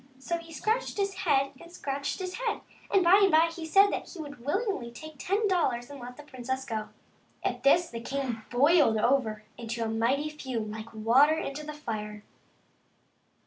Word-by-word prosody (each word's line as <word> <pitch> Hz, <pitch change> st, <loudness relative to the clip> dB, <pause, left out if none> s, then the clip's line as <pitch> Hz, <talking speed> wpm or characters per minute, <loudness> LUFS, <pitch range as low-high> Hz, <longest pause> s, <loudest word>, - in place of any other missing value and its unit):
So 335 Hz, +6 st, -3 dB
he 335 Hz, 0 st, -12 dB
scratched 440 Hz, +10 st, -1 dB
his 395 Hz, -1 st, 0 dB
head 280 Hz, -7 st, +1 dB
and 335 Hz, -, -13 dB
scratched 280 Hz, -3 st, -3 dB
his 370 Hz, -1 st, -4 dB
head, 465 Hz, -4 st, -1 dB, 0.3 s
and 390 Hz, -2 st, +4 dB
by 360 Hz, +4 st, +7 dB
and 395 Hz, -, +6 dB
by 325 Hz, +1 st, +5 dB
he 330 Hz, -1 st, -6 dB
said 395 Hz, +5 st, +6 dB
that -, -, -4 dB
he -, -, -10 dB
would 290 Hz, -4 st, -7 dB
be -, -, -16 dB
willing 395 Hz, -, 0 dB
to 235 Hz, -, -7 dB
take 310 Hz, +3 st, -11 dB
ten 410 Hz, +6 st, +1 dB
dollars 265 Hz, -9 st, 0 dB
and 285 Hz, -, -9 dB
let 245 Hz, 0 st, -9 dB
the 295 Hz, -, -10 dB
princess 260 Hz, -1 st, -4 dB
go. 220 Hz, -4 st, -4 dB, 0.5 s
At -, -, -1 dB
this 340 Hz, +5 st, +5 dB
the 230 Hz, -1 st, -5 dB
king 260 Hz, -3 st, -3 dB
boiled 285 Hz, -2 st, +4 dB
over 220 Hz, -2 st, +1 dB, 0.2 s
into 235 Hz, 0 st, -3 dB
a -, -, -1 dB
mighty 240 Hz, +7 st, +1 dB
fume, 250 Hz, -8 st, -4 dB
like 220 Hz, +1 st, -7 dB
water 250 Hz, +8 st, +4 dB
into 295 Hz, -1 st, -4 dB
the 300 Hz, 0 st, -6 dB
fire. 210 Hz, -7 st, -5 dB
280 Hz, 195 wpm, -29 LUFS, 235-335 Hz, 0.5 s, by